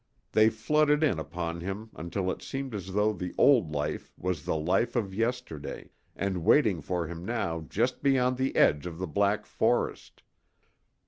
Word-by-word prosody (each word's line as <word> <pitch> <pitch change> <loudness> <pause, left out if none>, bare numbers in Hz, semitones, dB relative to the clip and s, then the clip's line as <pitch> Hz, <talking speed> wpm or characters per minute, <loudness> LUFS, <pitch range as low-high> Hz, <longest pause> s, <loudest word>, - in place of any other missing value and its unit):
They 110 0 +5
flooded 150 +7 +2
in 95 - +2
upon 85 +2 -4
him 100 +5 -5
until 90 +3 -2
it - - -6
seemed 135 -2 -5
as 95 -2 -5
though 105 +1 +2
the 90 -2 -6
old 120 - +5
life 75 0 -3
was 90 -4 -3
the - - 0
life 95 +9 +1
of 100 -6 -1
yesterday 115 -8 -3 0.2
and 95 -4 -2
waiting 105 - +4
for 90 +2 -2
him 85 +1 -7
now 90 -6 -2
just 120 +5 0
beyond 130 -2 +2
the 130 +1 -1
edge 75 +4 +3
of 85 -2 -7
the 95 - -3
black 100 +5 +1
forest. - - -1
100 Hz, 170 wpm, -29 LUFS, 85-120 Hz, 0.2 s, They